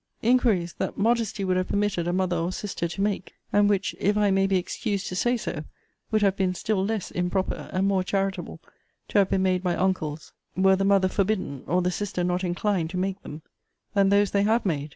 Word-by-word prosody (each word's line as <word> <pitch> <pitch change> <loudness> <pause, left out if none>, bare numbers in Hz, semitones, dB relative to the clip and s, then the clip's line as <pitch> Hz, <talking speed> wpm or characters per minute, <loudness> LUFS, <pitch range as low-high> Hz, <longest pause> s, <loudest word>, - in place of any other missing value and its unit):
inquiries 225 -8 +2
that - - -2
modesty 225 -1 +1
would 185 -1 +1
have 185 - 0
permitted 200 -4 0
a - - +1
mother 185 -1 0
or 170 +1 -1
sister 185 -3 -3
to 195 +4 -3
make; 200 -3 -2 0.2
and 205 0 +4
which, 200 -1 0
if 205 +2 +1
I 205 -1 +3
may 195 0 +3
be 195 -1 +2
excused 200 +2 -3
to 180 - -5
say 240 +6 +1
so, 155 -8 -4 0.5
would 215 -1 +1
have 195 -1 +3
been 185 -2 0
still 200 0 0
less 215 -1 -2
improper, 180 +2 -2
and 185 +1 0
more 195 -2 +2
charitable, 195 0 -2 0.5
to - - +3
have 195 - +3
been 190 - +1
made 185 -1 +2
by 180 -2 0
uncles, 160 -5 -2 0.2
(were 190 0 +5
the 195 - -1
mother 195 -1 +4
forbidden, 185 -8 -1
or 180 +1 +1
the 180 - +1
sister 180 -2 -3
not 180 +1 0
inclined, 180 -1 0
to 180 - -5
make 190 +1 -2
them,) 150 +1 -9 0.5
than 195 -1 +4
those 200 0 +3
they 200 - +2
have 220 +3 +2
made. 150 -5 -1
190 Hz, 215 wpm, -25 LUFS, 180-205 Hz, 0.5 s, were